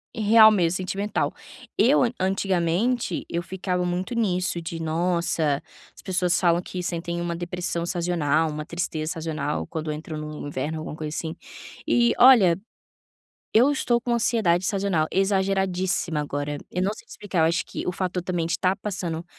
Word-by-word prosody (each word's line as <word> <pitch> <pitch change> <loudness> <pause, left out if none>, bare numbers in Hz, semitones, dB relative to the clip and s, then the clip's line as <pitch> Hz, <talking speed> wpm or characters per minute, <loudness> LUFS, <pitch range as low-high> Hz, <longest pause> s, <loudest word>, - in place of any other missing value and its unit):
real 220 0 +7
mesmo, 180 -3 +2
sentimental. 195 +3 -2 0.4
Eu, 270 +6 +5 0.2
antigamente, 190 +3 0
eu 170 - -2
ficava 180 0 -2
muito 180 +5 -2
nisso 185 -6 0
de: 165 0 -6
“Nossa, 165 -3 0 0.3
as - - -14
pessoas 180 -2 +1
falam 175 -1 +3
que 180 0 -6
sentem 170 0 -3
uma 170 0 -2
depressão 175 0 -3
sazonal, 165 -3 +1
uma 150 0 -5
tristeza 165 -2 -3
sazonal 155 -3 -3
quando 160 -2 -4
entra 155 +1 -6
no 150 -1 -6
inverno, 145 +3 -3
alguma 155 - -6
coisa 155 0 -5
assim". 160 -1 -4 0.5
E, 235 -1 +3
olha, 210 -9 +7 0.9
eu 245 +6 +5
estou 240 -4 +1
com 240 0 -1
ansiedade 220 -7 +2
sazonal 190 -5 +1
exageradíssima 190 -3 0
agora. 145 0 -3
Eu 180 - -2
não 195 +2 +1
sei - - -14
te - - -24
explicar. 200 -5 -3
Eu - - +5
acho 170 - 0
que - - -6
o 180 - 0
fato 180 0 -2
de 180 - -1
eu 175 - -13
também 175 -3 -1
estar 180 +3 +1
passando 175 -5 -4
175 Hz, 165 wpm, -24 LUFS, 165-195 Hz, 0.9 s, real